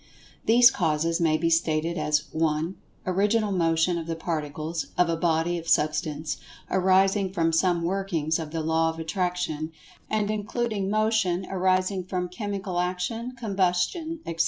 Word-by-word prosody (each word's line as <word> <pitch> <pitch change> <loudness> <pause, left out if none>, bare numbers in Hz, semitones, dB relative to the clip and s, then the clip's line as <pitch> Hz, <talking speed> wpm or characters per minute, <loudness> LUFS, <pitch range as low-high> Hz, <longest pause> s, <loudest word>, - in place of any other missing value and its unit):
These[Pg 240 +3 +7
124] - - -9
causes 165 0 +1
may 155 -2 +3
be 165 +1 0
stated 165 0 +1
as 150 -1 +1
(1) 160 +2 0 0.3
Original 205 +3 +1
Motion 170 -1 +2
of 165 - -7
the 165 - -2
Particles 160 0 -3
of 180 -1 +3
a 165 - +1
body 165 +1 +1
of 165 - -11
Substance, 150 0 0 0.3
arising 190 +1 +3
from 165 -3 +1
some 170 0 +2
workings 170 -4 -1
of 160 -2 -5
the 160 +1 -3
Law 160 +1 +2
of 160 - -5
Attraction, 165 -2 -2 0.4
and 215 -1 0
including 215 -1 -2
Motion 215 -4 +1
arising 185 0 +1
from 180 0 -3
Chemical 195 -1 -3
Action, 185 +8 -2
Combustion, 210 - -1
etc. 165 0 -5
175 Hz, 150 wpm, -26 LUFS, 160-195 Hz, 0.4 s, These[Pg